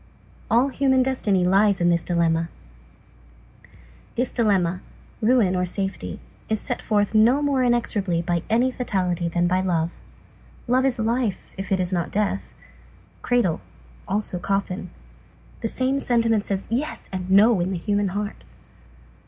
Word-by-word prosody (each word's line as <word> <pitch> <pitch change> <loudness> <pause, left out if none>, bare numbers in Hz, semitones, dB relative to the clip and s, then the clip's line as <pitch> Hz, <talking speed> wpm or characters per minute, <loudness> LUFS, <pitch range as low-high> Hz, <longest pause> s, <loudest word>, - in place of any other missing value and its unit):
All 240 +5 +3
human 265 -1 +2
destiny 210 -8 +1
lies 195 +1 +3
in 175 0 +3
this 170 -1 +1
dilemma. 165 -1 +1 1.7
This 250 +2 0
dilemma, 190 -6 +1 0.4
ruin, 220 -5 +3
or 180 - +1
safety, 195 +2 -4 0.3
is 220 -1 +1
set - - -4
forth 205 -1 +1
no 235 +7 +4
more 280 -2 +1
inexorably 205 -8 +1
by 175 -1 0
any 240 +4 +3
fatality 180 -8 -1
than 175 +1 0
by 185 +1 +2
love. 170 -2 -1 0.7
Love 255 +2 +3
is 265 -2 +1
life, 230 -2 -1
if 195 +1 -6
it 190 - +2
is 180 0 -1
not 175 -2 -1
death. 200 -1 -2 0.7
Cradle; 235 -10 +1 0.5
also 200 -2 -2
coffin. 195 -1 -2 0.7
The 225 - -2
same 260 +4 0
sentiment 230 -5 +1
says 195 -1 -2
"yes" 270 +6 -2
and 185 -1 -4
"no" 205 +2 +5
in 175 +1 0
the 185 - -2
human 205 +3 0
heart. 205 +2 -4
200 Hz, 145 wpm, -23 LUFS, 180-235 Hz, 1.7 s, no